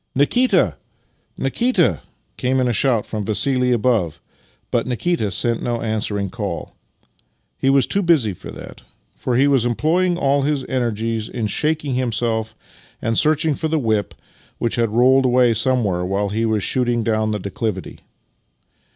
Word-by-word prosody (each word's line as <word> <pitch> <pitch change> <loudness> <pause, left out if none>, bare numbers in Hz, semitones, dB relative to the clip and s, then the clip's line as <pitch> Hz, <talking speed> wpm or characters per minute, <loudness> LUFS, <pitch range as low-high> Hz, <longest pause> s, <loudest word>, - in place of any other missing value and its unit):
" - - -48
Nikita, 175 - +2 0.6
Nikita! 170 - +1 0.2
" - - -44
came 130 +1 +1
in 130 - +2
a 120 - +1
shout 120 -3 +2
from 105 -2 -4
Vassili 125 +4 +1
above, 115 -9 +1 0.5
but 120 0 0
Nikita 125 -1 -1
sent 115 +3 -1
no 120 -1 -2
answering 105 -3 -2
call. 100 -6 -5 0.9
He 135 - +2
was 135 -2 +4
too 200 - +1
busy 155 - +2
for - - -11
that, - - -10 0.3
for 120 -2 -1
he 135 +2 +4
was 135 -4 +3
employing 170 +9 +1
all 140 -3 +2
his 140 -1 -1
energies 115 -3 -2
in 115 -3 -3
shaking 150 +4 0
himself 115 -3 -1 0.4
and 115 +1 -1
searching 155 +3 +2
for 160 +3 -2
the 160 0 0
whip, 110 -7 -1 0.4
which 115 - -1
had 115 -2 +1
rolled 130 +4 +4
away 125 -1 +4
somewhere 110 -6 0
while 100 +2 -1
he 110 +3 -1
was 110 -3 0
shooting 120 0 0
down 110 -1 0
the 105 - -1
declivity. 100 0 -4
120 Hz, 160 wpm, -20 LUFS, 110-135 Hz, 0.9 s, was